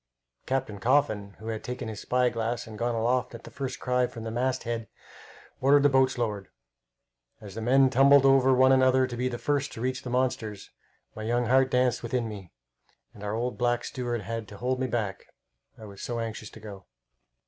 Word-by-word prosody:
Captain 130 -6 -2
Coffin, 110 -5 +1
who 110 +1 -7
had 110 -1 -4
taken 125 -1 -5
his 110 -2 -6
spy 125 0 +1
glass 115 0 -3
and 110 -2 -10
gone 120 0 0
aloft 120 +2 0
at - - -11
the - - -11
first 135 -2 -5
cry 125 0 +1
from 115 -2 -9
the 115 - -4
masthead, 120 -2 -2 0.7
ordered 140 +2 +5
the 145 - +6
boats 130 -1 +3
lowered. 105 -5 -2 0.9
As 105 -3 -10
the 115 - -6
men 130 +3 +4
tumbled 135 +1 +6
over 135 -1 +5
one 130 +1 +5
another 130 0 +4
to 125 -1 -6
be 125 +1 -1
first 140 +3 -1
to 115 - -7
reach 130 +1 -2
the 125 - -7
monsters, 120 -5 -2 0.4
my 110 - -7
young 120 +2 0
heart 130 +2 +4
danced 125 -1 +1
within 120 0 -2
me, 100 -5 -9 0.6
and 105 - -12
our 105 +1 -2
old 120 +2 -3
black 120 0 +1
steward 120 -3 -3
had 115 +2 -5
to 100 - -11
hold 125 +2 -1
me 130 - 0
back, 110 -5 -3 0.5
I 110 - -11
was 100 -1 -11
so 120 - -3
anxious 110 -1 -5
to - - -13
go. 100 -4 -10
120 Hz, 200 wpm, -27 LUFS, 110-130 Hz, 0.9 s, the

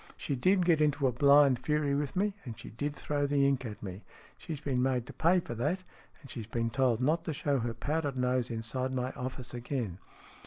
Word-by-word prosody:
She 140 - -2
did 185 +7 +3
get 165 -3 +4
into 145 -1 +2
a 130 - +4
blind 140 +1 +5
fury 150 +1 +1
with 145 +3 -1
me, 200 +2 +1
and 115 -5 -7
she - - -10
did 145 +6 -3
throw 145 0 -1
the 140 -1 +3
ink 135 -2 0
at 105 -1 -8
me. 95 0 -6 0.3
She's 160 -5 -6
been 135 -4 0
made 125 -2 +1
to - - -10
pay 175 +3 +3
for 120 - -6
that, 150 +11 -1 0.4
and 140 - -12
she's 110 -3 -6
been 115 0 -1
told 125 -2 +2
not 160 +5 +2
to 160 - -2
show 140 -1 0
her 115 -1 -2
powdered 145 -3 -1
nose 125 -1 +1
inside 125 +3 -3
my 125 0 -1
office 125 -1 -6
again. 120 -6 -3
135 Hz, 220 wpm, -31 LUFS, 125-150 Hz, 0.4 s, blind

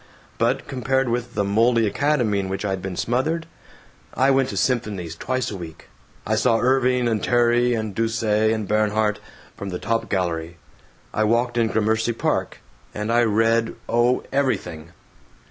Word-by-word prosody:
But 120 +3 0
compared 130 -1 0
with 120 0 -3
the 105 - +1
moldy 115 +3 +3
academy 115 -1 +1
in 95 -1 -3
which 95 +2 -3
I 100 - -1
had 95 -1 -3
been 95 -1 -5
smothered! 155 - -1 0.7
I 135 +1 +3
went 135 -1 +2
to - - -5
symphonies 105 -10 -1
twice 130 +6 -2
a - - -5
week. 85 -4 -10 0.4
I 110 - 0
saw 115 +1 +3
Irving 125 0 +2
and 110 -4 -1
Terry 120 0 +3
and 110 -2 -3
Duse 115 +2 -1
and 110 0 +1
Bernhardt, 105 0 +1 0.4
from 100 - -6
the 90 - -3
top 115 +4 -2
gallery. 85 -3 -2 0.6
I 110 - +1
walked 120 +3 +1
in 115 -1 +2
Gramercy 110 +1 +1
Park. - - -2 0.3
And 105 +2 -2
I 120 - +4
read, 115 +1 +2
oh, 120 +2 +2
everything. 125 - -2
115 Hz, 165 wpm, -22 LUFS, 105-125 Hz, 0.7 s, I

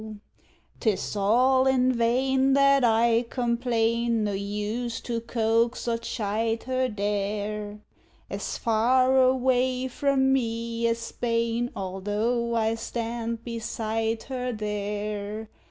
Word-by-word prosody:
'Tis 215 -2 -1
all 255 +6 +3
in 255 -1 +3
vain 260 +3 +2
that 275 -1 +5
I 230 0 +3
complain; 235 -2 0
No 205 - 0
use 210 +4 -3
to 230 -1 -3
coax 230 +1 0
or 230 -1 0
chide 225 0 -2
her 255 0 0
there; 210 0 -3 0.5
As - - -4
far 255 +3 +3
away 255 0 +2
from 265 0 +2
me 230 -2 -1
as 230 0 +1
Spain, 230 0 -1
Although 210 +5 -1
I 220 -1 +1
stand 230 0 -4
beside 225 -1 -2
her 250 -2 -3
there. 210 0 -4
230 Hz, 105 wpm, -26 LUFS, 215-250 Hz, 0.5 s, that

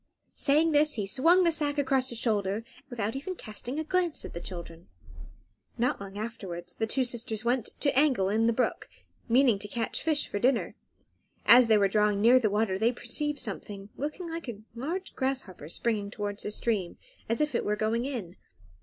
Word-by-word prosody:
Saying 310 +3 +3
this, 300 0 +3
he 210 -4 -2
swung 330 - +4
the 340 - +4
sack 295 -2 0
across 265 -2 +1
his 235 - -5
shoulder 205 -4 +1
and 225 +2 -6
went 260 - -23
off 265 +3 -23
without 225 -2 -3
even 330 +8 -4
casting 240 - -6
a - - -1
glance 350 0 0
at - - -8
the 170 - -6
children. 170 -1 -8 0.9
Not 240 -3 0
long 200 0 -8
afterwards 190 -6 -5
the 225 - -2
two 260 +4 +1
sisters 235 -2 -1
went 245 -1 +1
to 280 - +1
angle 265 -9 +3
in 220 +3 +2
the - - +4
brook, 245 +2 -1 0.4
meaning 240 -3 +4
to 205 - -4
catch 225 +2 -2
fish 310 -2 +1
for 205 - -3
dinner. 250 +2 +1 0.7
As 245 0 +8
they 220 -1 +5
were 200 -1 +4
drawing 210 0 +2
near 240 +5 +6
the 220 -4 +1
water 205 -2 0
they 225 +3 +3
perceived 290 +5 -2
something, 200 -2 -5
looking 305 +5 -4
like 330 -4 -6
a 215 -2 -8
large 330 +11 -4
grasshopper, 260 - -3
springing 210 +1 -1
towards 205 -1 -4
the - - -3
stream, 210 -4 -1 0.3
as 230 - 0
if 300 -2 0
it 235 - 0
were 210 - 0
going 220 +3 0
in. 215 -10 -5
235 Hz, 200 wpm, -28 LUFS, 205-275 Hz, 0.9 s, As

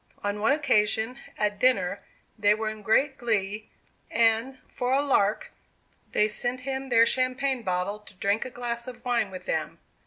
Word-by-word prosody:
On 205 0 -2
one 220 +6 +3
occasion, 250 -3 +1 0.2
at 205 -1 0
dinner, 200 -7 +2 0.3
they 210 -1 +3
were 220 0 -2
in 215 0 -10
great 265 +7 +2
glee, 215 -3 -1 0.4
and, 230 +3 +2
for 250 0 -2
a 275 - +4
"lark," 210 -7 +1 0.6
they 210 - +3
sent 245 +4 -1
him 265 0 -4
their 230 -2 +6
champagne 255 +1 0
bottle 185 +1 -2
to 210 -1 -16
drink 200 +3 0
a - - -6
glass 240 0 -5
of 255 0 -10
wine 235 -4 +1
with 185 -1 -9
them. - - -2
225 Hz, 165 wpm, -27 LUFS, 210-255 Hz, 0.6 s, their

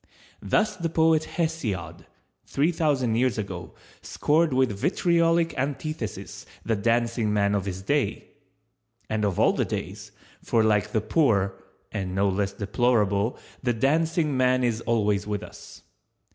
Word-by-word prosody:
Thus 215 0 +1
the 170 -3 -2
poet 160 -1 +3
Hesiod, 95 - -3 0.4
three 150 +5 +1
thousand 145 -8 +1
years 125 -3 +1
ago, 95 -4 -6 0.3
scored 155 +1 +1
with 130 -2 +2
vitriolic 170 - +1
antithesis 140 -3 -4 0.2
the 115 - +1
Dancing 115 +1 +1
man 100 -1 +2
of 100 -2 0
his 95 -1 -5
day⸺ 145 +7 0 0.9
And 110 -1 0
of 100 -4 0
all - - +4
the - - 0
days, - - -5 0.3
for 115 -2 +2
like 105 -1 +2
the 110 - +1
poor 105 -5 +2 0.4
(and 95 -2 -4
no 100 +1 +2
less 100 +1 -1
deplorable) 105 0 +1 0.2
the 120 -1 +1
Dancing 155 +4 +1
man 130 0 +2
is 115 -2 0
always 105 -4 0
with 105 -1 -3
us. - - -12
115 Hz, 140 wpm, -25 LUFS, 100-150 Hz, 0.9 s, all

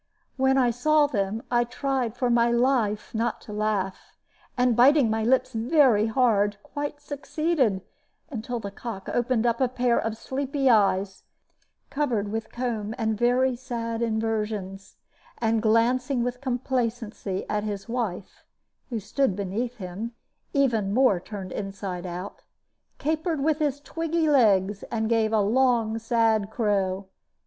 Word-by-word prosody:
When 265 0 +3
I 250 -2 +4
saw 300 +5 +3
them, 215 -5 -2
I 240 0 +4
tried 250 -1 -2
for 245 -1 +1
my 235 0 +4
life 235 -4 +1
not 230 +1 -1
to 210 - -9
laugh, 210 -3 -2 0.4
and 250 -1 +3
biting 260 -1 +5
my 220 0 0
lips 255 +2 +2
very 235 -2 +3
hard, 215 -4 +2
quite 290 0 -5
succeeded, 290 - -1 0.5
until 240 -1 -4
the 200 -2 -6
cock 200 -2 -7
opened 240 -1 +1
up 235 +1 +1
a 260 - +4
pair 245 -1 +1
of 225 0 -3
sleepy 270 +2 0
eyes, 195 -3 +2 0.7
covered 240 -9 -1
with 225 0 -4
comb 225 -3 -3
and 220 -2 0
very 245 +3 +2
sad 230 -2 -4
inversions, 215 -4 -2 0.4
and 225 -1 +1
glancing 240 +3 +2
with 245 +1 -3
complacency 240 -6 -2
at 210 0 -1
his 205 -2 -4
wife 225 -6 -4 0.5
(who 235 -3 -2
stood 215 +2 0
beneath 210 +5 -3
him, 200 +4 -6 0.4
even 225 -8 +1
more 250 -8 +4
turned 190 -1 -8
inside 195 -2 -5
out), 180 +3 -7 0.6
capered 315 +1 -1
with 310 0 +1
his 290 -2 0
twiggy 330 +2 -1
legs, 205 -8 +3
and 220 -1 -1
gave 225 -2 +2
a 220 -1 +3
long, 225 0 +2
sad 225 -2 +1
crow. 200 -4 0
230 Hz, 140 wpm, -26 LUFS, 210-255 Hz, 0.7 s, biting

